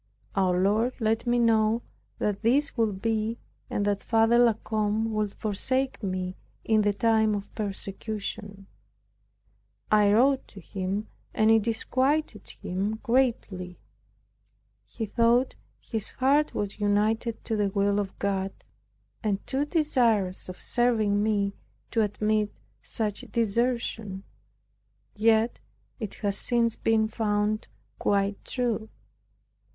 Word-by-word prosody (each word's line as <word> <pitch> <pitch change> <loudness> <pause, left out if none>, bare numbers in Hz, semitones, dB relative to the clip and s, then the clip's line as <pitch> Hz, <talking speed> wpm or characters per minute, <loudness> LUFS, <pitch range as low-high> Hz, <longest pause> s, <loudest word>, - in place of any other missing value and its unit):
Our 185 -2 +2
Lord 220 +6 +2
let 220 +1 0
me 240 0 +3
know 225 -1 +3 0.3
that 205 -1 -1
this 270 +6 +2
would 210 -5 0
be 225 0 0 0.3
and 205 - -1
that 205 -1 0
Father 225 +1 +3
La 240 -2 +6
Combe 215 +1 -1
would 210 -1 0
forsake 260 +6 -1
me 185 -2 -3 0.3
in 220 -1 +3
the 205 0 +3
time 220 0 +2
of 200 0 -6
persecution. 205 0 -5 1.3
I 210 -1 +5
wrote 260 +5 +3
to 200 - -12
him, 195 +3 -3 0.3
and 220 0 +4
it 225 0 +5
disquieted 255 +2 0
him 195 +4 -3
greatly. 230 -8 0 1.1
He 225 - -5
thought 235 +4 +2 0.3
his 220 -3 -4
heart 280 +4 +2
was 205 0 -3
united 215 +3 +1
to 225 - -1
the 205 -2 +1
will 200 +1 +1
of 195 -2 -4
God 195 -1 -1 0.7
and 205 -2 -1
too 275 +2 0
desirous 235 - +1
of 185 - -8
serving 220 -4 +2
me, 205 -2 +1 0.4
to 225 - +2
admit 210 0 +1 0.3
such 210 -2 -2
desertion; 225 -3 -1 0.9
yet 220 +2 +2 0.4
it 215 -4 -5
has 200 -1 +1
since 235 -2 +2
been 220 -1 +2
found 215 -1 0 0.3
quite 200 0 0
true. 235 -4 -2
215 Hz, 120 wpm, -27 LUFS, 200-230 Hz, 1.3 s, La